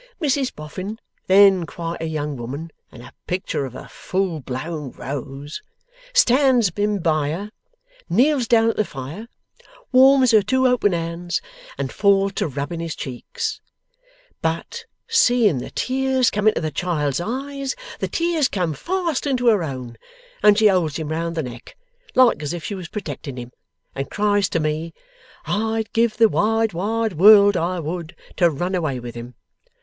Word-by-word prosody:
Mrs 280 Hz, -4 st, 0 dB
Boffin, 185 Hz, +8 st, -6 dB, 0.3 s
then 190 Hz, -2 st, +6 dB
quite 170 Hz, -1 st, -5 dB
a 165 Hz, -, -2 dB
young 150 Hz, -2 st, -3 dB
woman 140 Hz, +7 st, -6 dB, 0.2 s
and 120 Hz, 0 st, -12 dB, 0.2 s
pictur 180 Hz, -6 st, -2 dB
of 125 Hz, -, -12 dB
a -, -, -9 dB
full 185 Hz, -4 st, -2 dB
blown 140 Hz, +3 st, -5 dB
rose, 140 Hz, +2 st, -6 dB, 0.5 s
stands 260 Hz, -, +4 dB
him 205 Hz, 0 st, 0 dB
by 155 Hz, -5 st, 0 dB
her, 200 Hz, +7 st, -5 dB, 0.6 s
kneels 250 Hz, -, +3 dB
down 230 Hz, -1 st, +4 dB
at -, -, -12 dB
the 215 Hz, -, +3 dB
fire, 150 Hz, -, -8 dB, 0.6 s
warms 260 Hz, -1 st, +6 dB
her 215 Hz, -2 st, +6 dB
two 260 Hz, +5 st, +1 dB
open 245 Hz, -6 st, +3 dB
hands, 170 Hz, +1 st, -2 dB, 0.4 s
and 135 Hz, -1 st, -3 dB
falls 200 Hz, -1 st, +3 dB
to -, -, -1 dB
rubbing 145 Hz, +4 st, -4 dB
his 165 Hz, -2 st, -4 dB
cheeks; 430 Hz, -, -5 dB, 0.8 s
but 165 Hz, +1 st, -3 dB, 0.2 s
seeing 245 Hz, -, +3 dB
the 125 Hz, -, -6 dB
tears 260 Hz, -1 st, +1 dB
come 210 Hz, +1 st, 0 dB
into 215 Hz, -, +3 dB
the 155 Hz, -1 st, -2 dB
child's 150 Hz, -2 st, -1 dB
eyes, 275 Hz, +6 st, -4 dB, 0.2 s
the -, -, -1 dB
tears 335 Hz, -4 st, +1 dB
come 180 Hz, -8 st, -1 dB
fast 335 Hz, -, -2 dB
into 250 Hz, -3 st, +2 dB
her 210 Hz, -6 st, +3 dB
own, 130 Hz, -6 st, -6 dB, 0.4 s
and 210 Hz, -1 st, +6 dB
she 220 Hz, -, +3 dB
holds 175 Hz, -7 st, +1 dB
him 160 Hz, -2 st, -4 dB
round 165 Hz, +1 st, -2 dB
the 160 Hz, -, -1 dB
neck, 120 Hz, -2 st, -10 dB, 0.4 s
like 255 Hz, -9 st, +5 dB
as 150 Hz, +2 st, -3 dB
if 170 Hz, -2 st, -6 dB
she 205 Hz, -, -4 dB
was 185 Hz, -4 st, -6 dB
protecting 145 Hz, -8 st, -6 dB
him, 120 Hz, 0 st, -7 dB, 0.4 s
and 135 Hz, 0 st, -4 dB
cries 205 Hz, -2 st, +1 dB
to 165 Hz, -, 0 dB
me, 155 Hz, +2 st, -2 dB, 0.5 s
"I'd 220 Hz, +1 st, -1 dB
give 230 Hz, -1 st, +2 dB
the 225 Hz, 0 st, +6 dB
wide 225 Hz, 0 st, +1 dB
wide 220 Hz, +4 st, -1 dB
world, 200 Hz, +3 st, +7 dB
I 175 Hz, +1 st, -1 dB
would, 170 Hz, +2 st, -5 dB, 0.2 s
to 175 Hz, -, +5 dB
run 175 Hz, +5 st, -3 dB
away 155 Hz, -8 st, -1 dB
with 120 Hz, -1 st, -8 dB
him!" 120 Hz, +1 st, -9 dB
185 Hz, 165 wpm, -21 LUFS, 155-225 Hz, 0.8 s, world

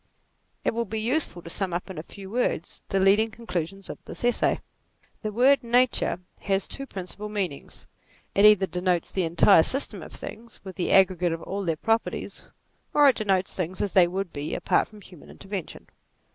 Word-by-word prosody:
It -, -, +2 dB
will 235 Hz, +1 st, -1 dB
be 220 Hz, +1 st, -4 dB
useful 230 Hz, -, -1 dB
to 170 Hz, -, -9 dB
sum 190 Hz, -1 st, -1 dB
up 175 Hz, -, -3 dB
in 185 Hz, -5 st, -7 dB
a -, -, -3 dB
few 195 Hz, +3 st, -11 dB
words 235 Hz, -8 st, -1 dB
the 195 Hz, -, +1 dB
leading 200 Hz, +4 st, +4 dB
conclusions 195 Hz, -4 st, -5 dB
of -, -, -9 dB
this -, -, -5 dB
Essay. 245 Hz, -, +2 dB, 0.6 s
The 215 Hz, -, -3 dB
word 260 Hz, +6 st, +4 dB
Nature 240 Hz, -5 st, +2 dB, 0.2 s
has 195 Hz, -1 st, 0 dB
two 275 Hz, 0 st, -6 dB
principal 200 Hz, +1 st, -7 dB
meanings: 190 Hz, -9 st, -5 dB, 0.5 s
it 200 Hz, -, +3 dB
either 210 Hz, -2 st, +7 dB
denotes 180 Hz, -2 st, -1 dB
the 185 Hz, -3 st, 0 dB
entire 165 Hz, 0 st, +6 dB
system 270 Hz, -, -2 dB
of -, -, -10 dB
things, 230 Hz, +2 st, -9 dB
with 190 Hz, -2 st, -8 dB
the 180 Hz, -, -1 dB
aggregate 180 Hz, -3 st, +4 dB
of 165 Hz, -, -6 dB
all 200 Hz, +1 st, -4 dB
their 165 Hz, -3 st, 0 dB
properties, 225 Hz, +6 st, -2 dB, 0.5 s
or 290 Hz, -1 st, +7 dB
it 260 Hz, -, +2 dB
denotes 195 Hz, -4 st, 0 dB
things 185 Hz, 0 st, -4 dB
as 200 Hz, -, -1 dB
they 180 Hz, -2 st, +6 dB
would 185 Hz, 0 st, -4 dB
be, 145 Hz, +1 st, -4 dB
apart -, -, +1 dB
from 210 Hz, -1 st, -15 dB
human 180 Hz, -5 st, -15 dB
intervention. 195 Hz, -4 st, -7 dB
195 Hz, 185 wpm, -26 LUFS, 180-220 Hz, 0.6 s, either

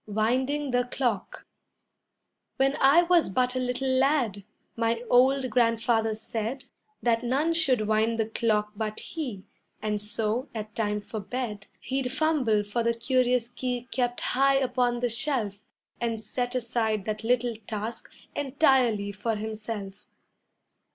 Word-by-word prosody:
WINDING 260 Hz, +7 st, 0 dB
THE 245 Hz, 0 st, +2 dB
CLOCK 250 Hz, 0 st, -2 dB, 1.1 s
When 270 Hz, +1 st, +2 dB
I 280 Hz, +6 st, +6 dB
was 345 Hz, -, +3 dB
but 250 Hz, +5 st, +1 dB
a -, -, +1 dB
little 250 Hz, +1 st, -1 dB
lad, 260 Hz, -6 st, +2 dB, 0.3 s
my 230 Hz, +1 st, 0 dB
old 260 Hz, +1 st, +4 dB
Grandfather 230 Hz, -2 st, +2 dB
said 225 Hz, +4 st, -4 dB, 0.4 s
That 230 Hz, -1 st, +2 dB
none 280 Hz, +7 st, +1 dB
should 260 Hz, -10 st, +2 dB
wind 220 Hz, +1 st, +2 dB
the 220 Hz, -, +1 dB
clock 215 Hz, -1 st, 0 dB
but 215 Hz, 0 st, -3 dB
he, 250 Hz, -, -5 dB, 0.4 s
and 210 Hz, -1 st, -1 dB
so, 215 Hz, +4 st, -1 dB
at 215 Hz, -1 st, -5 dB
time 210 Hz, -1 st, -1 dB
for 215 Hz, +2 st, -6 dB
bed, 210 Hz, -1 st, -4 dB
He'd 265 Hz, -1 st, -2 dB
fumble 270 Hz, -8 st, +2 dB
for 205 Hz, +4 st, -2 dB
the 235 Hz, 0 st, +1 dB
curious 250 Hz, 0 st, +2 dB
key 245 Hz, -1 st, -3 dB
kept 245 Hz, -1 st, -1 dB
high 275 Hz, +1 st, +3 dB
upon 250 Hz, -2 st, +1 dB
the 245 Hz, -, +1 dB
shelf 225 Hz, -5 st, -1 dB, 0.4 s
And 230 Hz, -2 st, -1 dB
set 245 Hz, +3 st, -3 dB
aside 225 Hz, -4 st, 0 dB
that 215 Hz, 0 st, -3 dB
little 245 Hz, 0 st, +1 dB
task 220 Hz, +1 st, -5 dB, 0.2 s
entirely 260 Hz, -7 st, +2 dB
for 210 Hz, +3 st, -2 dB
himself. 215 Hz, -2 st, -6 dB
235 Hz, 140 wpm, -27 LUFS, 215-260 Hz, 1.1 s, I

